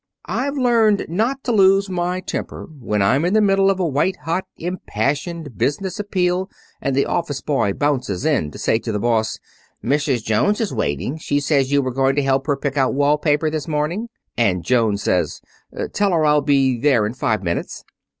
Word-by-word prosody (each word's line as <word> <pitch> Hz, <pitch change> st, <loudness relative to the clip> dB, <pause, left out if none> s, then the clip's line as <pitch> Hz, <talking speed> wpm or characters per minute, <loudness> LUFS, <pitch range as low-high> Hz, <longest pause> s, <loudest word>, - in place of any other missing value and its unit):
"'I've 280 Hz, +2 st, -2 dB
learned 230 Hz, -5 st, +3 dB
not 230 Hz, +10 st, -1 dB
to 245 Hz, -, -1 dB
lose 195 Hz, -2 st, +4 dB
my 180 Hz, 0 st, -2 dB
temper -, -, -5 dB
when 105 Hz, -4 st, 0 dB
I'm 130 Hz, +10 st, +2 dB
in 180 Hz, +4 st, +1 dB
the -, -, +5 dB
middle 195 Hz, -2 st, +3 dB
of 195 Hz, -1 st, 0 dB
a 180 Hz, -, +1 dB
white 150 Hz, +6 st, 0 dB
hot, 175 Hz, +4 st, -1 dB
impassioned 150 Hz, -, -3 dB
business 185 Hz, +9 st, -1 dB
appeal 185 Hz, -2 st, 0 dB, 0.3 s
and 135 Hz, -, -1 dB
the 140 Hz, -, +2 dB
office 165 Hz, -5 st, -2 dB
boy 135 Hz, -9 st, 0 dB
bounces 130 Hz, -7 st, -1 dB
in 145 Hz, -, +1 dB
to -, -, -11 dB
say 110 Hz, -, +1 dB
to 115 Hz, -, -4 dB
the 105 Hz, -, -1 dB
boss: 110 Hz, 0 st, 0 dB, 0.5 s
"Mrs. 140 Hz, -3 st, +1 dB
Jones 110 Hz, -, +1 dB
is 220 Hz, -, -2 dB
waiting. 110 Hz, -, -2 dB
She 145 Hz, -1 st, 0 dB
says 140 Hz, -2 st, +1 dB
you 140 Hz, -1 st, +3 dB
were 130 Hz, -1 st, -3 dB
going 135 Hz, +1 st, +2 dB
to 145 Hz, -, +1 dB
help 135 Hz, +1 st, 0 dB
her 145 Hz, -2 st, +1 dB
pick 140 Hz, 0 st, -3 dB
out 130 Hz, -1 st, +2 dB
wall 145 Hz, +1 st, +2 dB
paper 150 Hz, +1 st, +1 dB
this 155 Hz, -2 st, -3 dB
morning;" 160 Hz, +9 st, -2 dB, 0.3 s
and 95 Hz, -7 st, +1 dB
Jones 110 Hz, -5 st, +1 dB
says, 85 Hz, -4 st, 0 dB, 0.5 s
"Tell 200 Hz, -2 st, +1 dB
her 160 Hz, -2 st, +2 dB
I'll 150 Hz, 0 st, +4 dB
be 135 Hz, -3 st, +2 dB
there 125 Hz, -5 st, +3 dB
in 105 Hz, -, -3 dB
five 110 Hz, -5 st, -1 dB
minutes."' 85 Hz, -1 st, -3 dB
145 Hz, 195 wpm, -20 LUFS, 125-185 Hz, 0.5 s, the